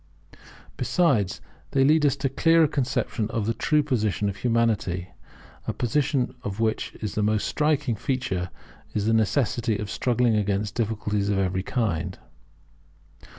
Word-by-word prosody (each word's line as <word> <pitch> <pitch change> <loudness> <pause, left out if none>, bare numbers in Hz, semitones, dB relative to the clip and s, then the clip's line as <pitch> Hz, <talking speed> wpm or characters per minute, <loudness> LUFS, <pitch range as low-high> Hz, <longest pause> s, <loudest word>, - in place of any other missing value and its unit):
Besides, 125 - +1 0.3
they 135 - +4
lead 150 +1 +5
us 140 - +2
to 135 0 -1
a - - -6
clearer 165 -1 +4
conception 125 -6 -1
of 110 -2 -2
the 115 - +1
true 150 +5 +2
position 110 - 0
of 100 - -6
Humanity, 110 -6 0 0.6
a - - -1
position 135 +1 0
of 100 +1 -5
which 110 -1 -1
the 105 0 -1
most 105 0 +1
striking 150 -5 +1
feature 115 -7 -2 0.5
is 105 - 0
the 115 - +2
necessity 115 0 +1
of 105 -1 -5
struggling 120 -2 +2
against 105 0 0
difficulties 105 -3 -1
of 100 - +1
every 95 -1 0
kind. 105 -6 -2
115 Hz, 145 wpm, -25 LUFS, 105-135 Hz, 0.6 s, lead